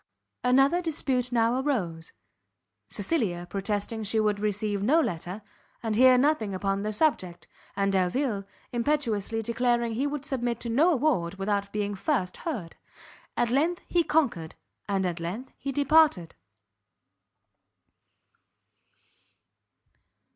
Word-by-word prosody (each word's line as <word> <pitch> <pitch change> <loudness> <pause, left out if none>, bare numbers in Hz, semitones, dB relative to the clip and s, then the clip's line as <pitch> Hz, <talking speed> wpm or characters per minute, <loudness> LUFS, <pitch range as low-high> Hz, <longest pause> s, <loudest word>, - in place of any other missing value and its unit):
Another 270 +7 +4
dispute 265 -7 -1
now 235 +1 +2
arose; 175 - -2 0.8
Cecilia 190 - -1
protesting 205 +3 -3
she 220 +1 0
would 210 -1 +1
receive 205 -1 -1
no 275 +11 +4
letter, 180 - -3 0.4
and 220 -2 -1
hear 255 +2 +7
nothing 250 -8 +1
upon 195 +1 -1
the 210 +1 -2
subject; 190 - 0 0.3
and 195 0 +1
Delvile 200 +3 0 0.3
impetuously 230 -4 0
declaring 235 0 0
he 265 +6 0
would 290 -1 -4
submit 240 -5 -2
to 235 - -3
no 310 +10 +4
award 255 - +1
without 200 +1 -1
being 205 -1 -2
first 195 -3 -1
heard. 225 - -5 0.6
At 240 -1 +1
length 320 +7 +1
he 345 -1 +2
conquered, 245 - 0 0.3
and 195 -1 +1
at 175 -1 -2
length 190 +10 -5
he 275 - -3
departed. 290 - +3
225 Hz, 120 wpm, -27 LUFS, 195-275 Hz, 0.8 s, hear